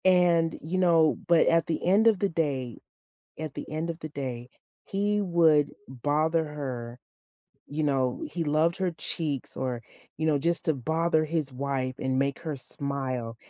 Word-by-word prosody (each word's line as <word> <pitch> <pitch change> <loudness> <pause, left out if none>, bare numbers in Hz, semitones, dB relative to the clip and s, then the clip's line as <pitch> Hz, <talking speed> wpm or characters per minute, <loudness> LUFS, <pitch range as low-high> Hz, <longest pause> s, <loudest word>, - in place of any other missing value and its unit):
And, 175 -3 +4
you 170 +5 -3
know 165 -4 +4
but 170 -1 +5
at 165 0 +4
the 165 - -2
end 200 +5 +5
of 215 -4 +4
the 200 - +1
day, 140 -8 -2 0.6
at 155 -3 -4
the - - -7
end 155 +2 -3
of 165 0 -4
the 155 - -6
day, 130 -4 -5 0.4
he 205 +1 0
would 165 -6 +4 0.2
bother 150 +5 +1
her. 130 -5 -6 0.7
You 155 +2 -2
know, 130 -4 0
he 170 - -2
loved 155 +3 +2
her 185 -2 0
cheeks 150 -4 -3
or, 125 -2 -2 0.4
you 160 - -1
know, 155 -2 +3
just 170 +4 0
to 160 - +3
bother 160 +4 +1
his 155 -3 -1
wife 130 -1 -2
and 130 0 0
make 140 0 0
her 160 -3 -4
smile, 130 -3 -4
155 Hz, 170 wpm, -27 LUFS, 135-170 Hz, 0.7 s, but